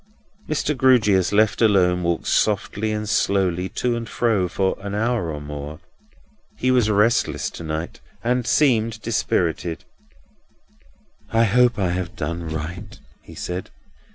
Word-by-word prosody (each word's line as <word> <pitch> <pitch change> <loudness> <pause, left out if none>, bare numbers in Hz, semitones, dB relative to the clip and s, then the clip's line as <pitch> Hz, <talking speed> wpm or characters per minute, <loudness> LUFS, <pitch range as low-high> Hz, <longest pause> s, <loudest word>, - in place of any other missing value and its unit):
Mr. 150 0 0
Grewgious, 110 -8 +3
left 105 +2 +2
alone, 90 -5 +3
walked 85 -1 -1
softly 105 +1 0
and 105 0 -3
slowly 95 -3 +1
to 125 -1 -1
and 115 -1 -5
fro, 110 -6 +1
for 95 +2 0
an 100 0 -5
hour 110 -5 0
and 75 -1 -7
more. 75 +1 -7 0.8
He 130 - +1
was 125 -4 +3
restless 105 +3 +1
to - - -9
night, 80 +1 -4 0.2
and 125 0 0
seemed 115 -6 +2
dispirited. 85 -7 -1 1.5
"I 115 +1 +3
hope 120 +2 +3
I 95 -4 0
have 90 -1 -4
done 85 +2 -4
right," 85 +6 -6 0.2
he - - -14
said. 90 +1 -5
100 Hz, 135 wpm, -22 LUFS, 90-115 Hz, 1.5 s, Grewgious